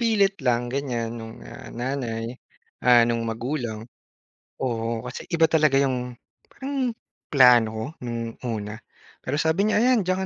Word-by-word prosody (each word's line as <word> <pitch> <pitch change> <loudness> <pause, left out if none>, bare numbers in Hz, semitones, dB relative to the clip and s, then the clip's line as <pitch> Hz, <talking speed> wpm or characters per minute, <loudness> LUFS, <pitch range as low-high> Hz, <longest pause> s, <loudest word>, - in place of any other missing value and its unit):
pilit 200 -6 +2
lang 120 -1 0
ganyan 120 -5 -2
no'ng, 110 - -10
ah, - - -10
nanay, 120 -3 -3 0.5
ah, 120 -1 +6
no'ng 115 0 0
magulang. 115 -1 -3 0.7
Oo, 115 -1 -2
kasi 125 - -8
iba 165 -1 +4
talaga 155 -4 +3
'yong, 125 -3 -1 0.3
parang 270 -2 -2 0.4
plano 125 -5 +7
ko 110 0 -4 0.2
no'ng 115 -1 -5
una. 105 -1 -4 0.5
Pero 145 +3 -2
sabi 175 +7 +2
niya, 210 - +3
"Ayan 245 -2 +4
diyan 185 +1 0
125 Hz, 140 wpm, -25 LUFS, 115-160 Hz, 0.7 s, plano